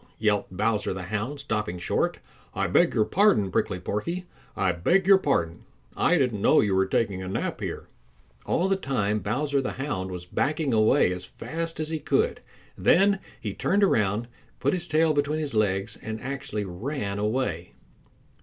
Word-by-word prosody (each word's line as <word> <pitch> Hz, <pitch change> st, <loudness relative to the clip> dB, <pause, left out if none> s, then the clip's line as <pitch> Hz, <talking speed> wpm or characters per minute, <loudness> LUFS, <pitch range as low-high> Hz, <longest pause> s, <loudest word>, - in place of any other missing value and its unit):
yelped 105 Hz, -2 st, +1 dB
Bowser 105 Hz, -2 st, 0 dB
the 95 Hz, -, -5 dB
Hound, 110 Hz, +9 st, -3 dB
stopping 105 Hz, -9 st, -2 dB
short. 90 Hz, -, 0 dB, 0.4 s
"I -, -, 0 dB
beg -, -, +3 dB
your 110 Hz, -, +3 dB
pardon, 190 Hz, -, +3 dB
Prickly 90 Hz, -, 0 dB
Porky, 170 Hz, -, -3 dB, 0.3 s
I 95 Hz, -1 st, +2 dB
beg 170 Hz, -, +2 dB
your 195 Hz, 0 st, +7 dB
pardon, 85 Hz, -, 0 dB, 0.3 s
I -, -, +3 dB
didn't 120 Hz, -6 st, 0 dB
know -, -, +5 dB
you 100 Hz, -2 st, +2 dB
were 95 Hz, 0 st, +2 dB
taking 95 Hz, -2 st, 0 dB
a 95 Hz, -, -5 dB
nap 95 Hz, -, -3 dB
here." -, -, -5 dB, 0.6 s
All 180 Hz, -, +2 dB
the 195 Hz, -, +2 dB
time 105 Hz, -, 0 dB
Bowser 140 Hz, +7 st, 0 dB
the 130 Hz, -, -3 dB
Hound 125 Hz, -9 st, -3 dB
was 90 Hz, -1 st, -6 dB
backing 145 Hz, -, -1 dB
away 110 Hz, -2 st, +4 dB
as 90 Hz, 0 st, -7 dB
fast 165 Hz, -, -5 dB
as 155 Hz, 0 st, -2 dB
he 160 Hz, -1 st, -2 dB
could. -, -, 0 dB, 0.3 s
Then 195 Hz, +1 st, +4 dB, 0.2 s
he -, -, -4 dB
turned 200 Hz, +1 st, +1 dB
around, 105 Hz, -, +2 dB, 0.3 s
put 140 Hz, -, +1 dB
his 175 Hz, -2 st, -2 dB
tail 160 Hz, 0 st, +3 dB
between 145 Hz, +1 st, 0 dB
his 150 Hz, -3 st, -3 dB
legs 100 Hz, -3 st, 0 dB
and 110 Hz, 0 st, -5 dB
actually 130 Hz, -6 st, -4 dB
ran 100 Hz, +2 st, -4 dB
away. 105 Hz, -6 st, -2 dB
110 Hz, 175 wpm, -26 LUFS, 100-150 Hz, 0.6 s, your